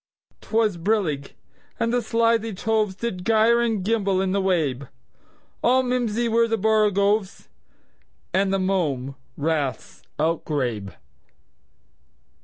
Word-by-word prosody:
'T - - -17
was 220 -4 +2
brillig, 165 -7 -1 0.5
and 230 +1 0
the 245 - +2
slithy 230 0 +1
tovesDid 210 -1 -1
gyre 225 +3 +4
and 220 -5 -1
gimble 200 -4 +1
in 190 0 0
the 200 +1 +1
wabe; 150 -9 0 0.8
All 255 +2 +4
mimsy 240 -2 0
were 230 0 +3
the 225 0 0
borogoves, 210 -1 +1 0.8
And 190 0 +2
the 195 - +2
mome 155 -9 -1 0.2
raths 150 -3 -2 0.2
outgrabe. 135 -10 -2
200 Hz, 110 wpm, -23 LUFS, 165-225 Hz, 0.8 s, gyre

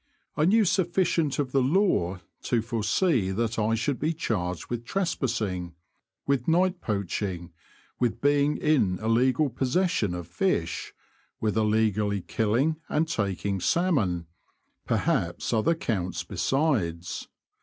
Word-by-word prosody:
I 150 - +2
knew 215 +4 +4
sufficient 175 -4 +1
of 140 -3 -1
the 135 - +3
law 130 - +1 0.2
to 115 -3 +1
forsee 115 - +1
that 115 +1 -1
I 110 +1 +2
should 125 +4 -1
be 160 +2 0
charged 90 - -2
with 120 -1 -4
tres 185 +8 -1
passing; 95 - -2 0.5
with 140 -3 0
night 180 +2 +2
poaching; 95 -4 -3 0.5
with 120 -3 0
being 145 +1 +2
in 130 -12 +2
illegal 125 - +2
possession 130 - 0
of 90 -2 -6
fish; 85 - -1 0.5
with 105 -3 0
illegally 105 -2 +1
killing 120 - 0
and 160 +2 +1
taking 100 - -1
salmon; 105 - +1 0.6
perhaps 85 +7 0
other 135 +10 +2
counts 95 - -2
besides. 100 - -1
115 Hz, 125 wpm, -27 LUFS, 100-155 Hz, 0.6 s, knew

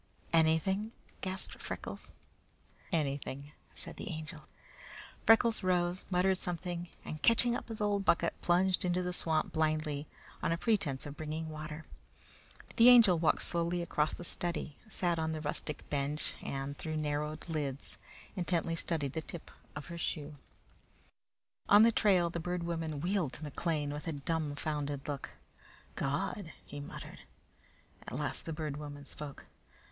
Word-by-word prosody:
"Anything!" 165 +7 +3 0.3
gasped 190 0 -1
Freckles. - - -6 0.8
"Anything," 140 -3 -1 0.2
said - - -9
the - - -4
Angel. 155 -2 -5 0.8
Freckles 225 -1 +6
arose, 180 0 +2
muttered 185 +1 +3
something, 175 0 -2 0.2
and 155 -1 -5
catching 235 +1 +4
up - - -4
his 225 -2 -5
old 205 -1 +2
bucket, 175 - +3
plunged 180 +1 +3
into 180 0 +1
the 180 0 -2
swamp 160 -3 +1
blindly 155 -2 0 0.3
on - - +1
a 165 - +2
pretence 175 - +1
of 145 -1 -6
bringing 155 +1 -4
water. 155 0 -6 0.9
The 235 +1 +9
Angel 225 -9 +8
walked 160 - +3
slowly 170 0 0
across 155 -2 +1
the - - -7
study, 170 -3 -2
sat 175 -5 0
on 160 0 0
the 155 - -3
rustic 150 0 -3
bench, 145 +1 0
and, 135 +1 -3
through 155 +1 -3
narrowed 150 +1 -2
lids, 145 -4 -3 0.4
intently 170 -2 0
studied 155 -5 -1
the 160 - -1
tip 165 +1 -7 0.2
of - - -5
her 170 -1 -7
shoe. 150 -2 -2 1.3
On 205 +2 +9
the 230 - +7
trail 185 -6 +4
the 170 - -2
Bird 180 +1 -2
Woman 165 -3 -2
wheeled 175 -5 +1
to 155 - -7
McLean 150 0 -1
with 150 +3 -5
a 165 - 0
dumbfounded 145 -1 -2
look. 145 -2 -3 0.6
"God!" 170 +5 -2 0.2
muttered 145 0 -7
he. - - -16 0.8
At - - -5
last - - -2
the - - -2
Bird 150 -2 -3
Woman 145 -1 -7
spoke. 145 0 -7
160 Hz, 145 wpm, -33 LUFS, 150-180 Hz, 1.3 s, The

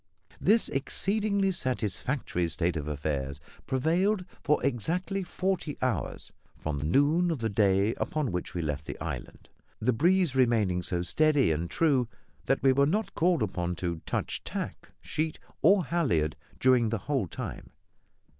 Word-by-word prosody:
This 220 +4 +4
exceedingly 200 +7 0
satisfactory 125 - -1
state 85 +2 0
of 75 -2 -3
affairs 70 -2 -3 0.3
prevailed 180 +9 +1 0.2
for 150 0 +3
exactly 170 - -1
forty 185 -4 -2
hours 130 -1 -2 0.3
from 75 -1 -3
noon 155 - +3
of 165 - 0
the 115 -3 -2
day 100 +1 +3
upon 150 -7 -1
which 90 0 -4
we 85 - -1
left 75 -1 -3
the - - -6
island; - - -6 0.3
the 120 +3 +2
breeze 175 +2 +3
remaining 110 -8 +3
so 85 0 -2
steady 145 - +3
and 80 +2 -1
true 140 -7 +2 0.4
that 135 - +1
we 135 - +6
were 140 +1 +4
not 210 +7 -1
called 170 -5 +2
upon 90 -3 -2
to 85 -1 -3
touch - - -2
tack, - - -5
sheet, 155 0 -2 0.2
or 190 +1 +5
halliard 105 - +1 0.2
during 125 -3 +4
the 115 - 0
whole 135 -10 0
time. - - -6
130 Hz, 145 wpm, -29 LUFS, -, 0.4 s, we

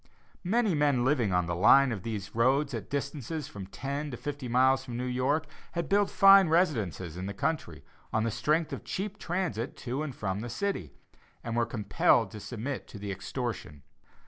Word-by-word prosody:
Many 215 +2 +2
men 145 -5 +2
living 130 -7 +2
on 90 -1 +2
the 85 - -2
line 135 +9 +6
of 105 -5 -3
these 105 -2 -5
roads 135 +5 +2
at 110 -3 -5
distances 140 +1 -3
of - - -12
from 95 -2 -7
ten 140 +8 -4
to 125 - -6
fifty 145 -1 -5
miles 130 +2 +3
from 120 -3 -6
New 125 - -2
York, 130 +5 0 0.3
had 170 -1 -2
built 200 0 +3
fine 195 -2 +7
residences 110 - 0
in 95 +1 -4
the 100 - -5
country, 160 +10 -3 0.3
on 110 - +1
the 115 - 0
strength 155 +7 0
of - - -6
cheap 205 +1 -4
transit 170 - -2
to 130 +3 -3
and 145 -5 -4
from 95 -2 -2
the 120 +3 -5
city, 120 - -3 0.5
and 115 -1 -3
were 120 -1 +1
compelled 110 -3 +2
to 105 - -8
submit 120 +6 -5
to - - -10
the 100 0 -5
extortion. 100 - -5
130 Hz, 195 wpm, -29 LUFS, 110-150 Hz, 0.5 s, fine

